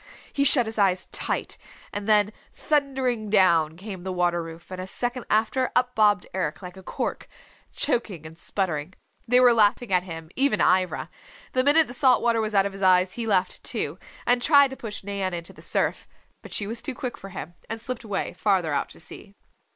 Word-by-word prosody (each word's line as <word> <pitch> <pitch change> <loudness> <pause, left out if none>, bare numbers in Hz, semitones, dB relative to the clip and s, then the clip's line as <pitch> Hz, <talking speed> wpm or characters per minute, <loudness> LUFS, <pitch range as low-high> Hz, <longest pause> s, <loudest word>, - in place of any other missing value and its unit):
He 280 - +1
shut 270 -3 +6
his 220 0 -5
eyes 185 -2 +2
tight, - - -2 0.3
and 205 0 -4
then 210 -1 +3 0.2
thundering 265 -7 -1
down 165 -6 +3
came 190 -1 -8
the 190 +1 -4
water 175 -1 +1
roof, 165 +2 -10
and 185 0 -5
a 185 - -6
second 245 +4 -2
after, 225 +4 +1
up 250 0 +2
bobbed 210 -5 +3
Eric 185 -1 -3
like 180 0 -8
a 190 - -11
cork, - - -4 0.4
choking 220 - -1
and 155 +1 -10
sputtering. 170 -2 -3 0.3
They 250 +2 +5
were 250 -1 +6
laughing 215 0 +2
at 180 - +4
him, 165 -3 -9
even 270 -5 +2
Ivra. 185 -1 +1 0.4
The 255 - +3
minute 305 +3 +5
the 245 - -8
salt 255 0 +3
water 230 -1 +2
was 215 -1 -3
out 195 0 +4
of 200 - -3
his 195 - -10
eyes 185 -1 +4
he 235 -1 -4
laughed, 185 -3 0
too, - - -3 0.3
and 245 0 +3
tried 280 -1 +5
to - - -6
push 215 -6 -7
Nan 195 -2 -3
into 170 0 -7
the - - -15
surf. - - -1 0.3
But - - -12
she 205 - -1
was 230 +3 -2
too 275 - -4
quick 250 -1 -4
for 195 - -11
him, 175 -3 -8 0.2
and 225 +1 -4
slipped 250 +1 -6
away, 205 -3 -3
farther 185 -7 +1
out 140 - -1
to - - -14
sea. 195 +4 -9
205 Hz, 205 wpm, -25 LUFS, 185-245 Hz, 0.4 s, shut